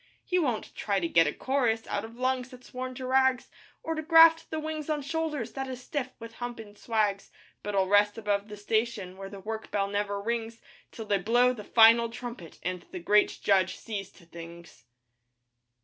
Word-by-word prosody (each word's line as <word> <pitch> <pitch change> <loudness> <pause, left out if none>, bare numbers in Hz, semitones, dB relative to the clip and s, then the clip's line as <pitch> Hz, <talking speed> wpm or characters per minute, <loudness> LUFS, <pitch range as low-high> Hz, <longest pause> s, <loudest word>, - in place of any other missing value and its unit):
He 365 -1 +1
won't 250 -10 -2
try 200 -2 -1
to 170 - -1
get 165 -1 +4
a - - +1
chorus 240 - 0
Out 200 - -3
of 225 +1 -9
lungs 255 0 -1
that's 255 -1 -15
worn 255 0 -5
to 260 0 -6
rags, 260 -1 +2 0.3
Or 325 - -2
to 315 - -3
graft 325 0 +6
the 315 - -3
wings 310 -1 -5
on 300 -2 -1
shoulders 300 -5 -3
That 270 -1 -4
is 255 -1 -6
stiff 270 -2 -3
with 230 0 -10
humpin' 225 -4 -6
swags. 210 -3 -1 0.3
But 205 0 -4
I'll 190 -1 +3
rest 205 +2 +3
about 205 -2 -1
the 210 -1 -9
station 215 -3 -1
Where 195 0 -8
the 200 - -9
work 220 +2 -5
bell 200 -1 0
never 205 0 -2
rings, 230 +1 -3 0.3
Till 225 - -8
they 205 -1 +1
blow 240 +6 +3
the 215 -4 -8
final 230 +2 +6
trumpet 230 -8 -8
And 180 0 -3
the - - -7
Great 210 +4 +3
Judge 190 -2 +2
sees 200 -3 -6
to 170 - -19
things. 170 -4 -12
225 Hz, 195 wpm, -28 LUFS, 200-255 Hz, 0.3 s, graft